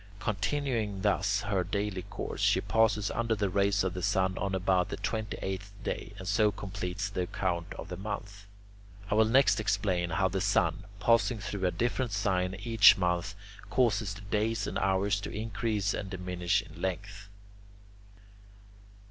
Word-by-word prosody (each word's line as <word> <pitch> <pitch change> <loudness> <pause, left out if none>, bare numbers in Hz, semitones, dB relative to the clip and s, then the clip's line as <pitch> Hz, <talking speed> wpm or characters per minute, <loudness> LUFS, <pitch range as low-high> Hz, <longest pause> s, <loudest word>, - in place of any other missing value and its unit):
Continuing 110 -2 -1
thus 100 +1 +2
her 100 -3 0
daily 100 +1 -2
course, 95 +1 -6
she - - +4
passes 110 -2 +2
under 115 -1 0
the 100 -2 -1
rays 100 +1 +2
of 95 -2 -1
the 90 - -4
sun 95 +2 +1
on 95 -1 -1
about 95 -1 +2
the - - -4
twenty 110 -2 -3
eighth 95 +1 -4
day, - - -4
and 95 - -8
so 105 +1 +3
completes 100 -1 -4
the 100 -3 -3
account 90 -1 -2
of - - -8
the 90 - -5
month. 100 0 -6 0.6
I - - +4
will 110 +1 +5
next 130 +4 +4
explain 90 -5 0
how 95 +4 +2
the 95 +1 -2
sun, - - +1
passing 115 +1 +3
through 100 -3 -2
a - - +1
different 120 -1 -1
sign 95 -2 0
each 115 -2 +7
month, 90 +1 0 0.3
causes 110 -5 +1
the 105 - -10
days 105 +2 -1
and - - -2
hours 100 +2 +1
to - - -5
increase 105 -1 -1
and 100 - -4
diminish 90 +1 -1
in 85 -4 -13
length. 100 +2 -4
100 Hz, 165 wpm, -30 LUFS, 95-105 Hz, 0.6 s, each